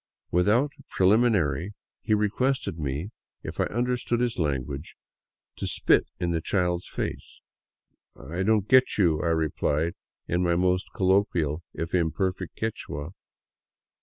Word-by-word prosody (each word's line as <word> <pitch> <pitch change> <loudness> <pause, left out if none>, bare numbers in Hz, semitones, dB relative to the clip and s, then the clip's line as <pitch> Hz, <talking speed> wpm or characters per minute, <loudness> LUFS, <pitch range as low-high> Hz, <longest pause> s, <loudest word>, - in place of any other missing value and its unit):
Without 110 - +3 0.2
preliminary 100 - +2 0.3
he 110 -1 +2
requested 105 -2 0
me, 75 +7 -3 0.3
if - - -7
I - - +3
un 120 +3 0
derstood 125 -1 -1
his 120 -3 -1
language, 70 -1 -3 0.6
to - - -3
spit - - +3
in 85 -1 0
the 80 -1 0
child's 90 0 0
face. - - -5 0.4
" - - -51 0.2
I 90 - -1
don't 105 0 +2
get 130 0 +4
you," 85 -6 +3
I - - -1
replied, 80 0 0 0.3
in 85 +1 0
my 85 -1 +2
most 90 +1 +1
colloquial 90 -5 +1
if 80 0 -4
imperfect 90 +1 -1
Quichua. 85 -8 -4
90 Hz, 135 wpm, -26 LUFS, 80-105 Hz, 0.6 s, get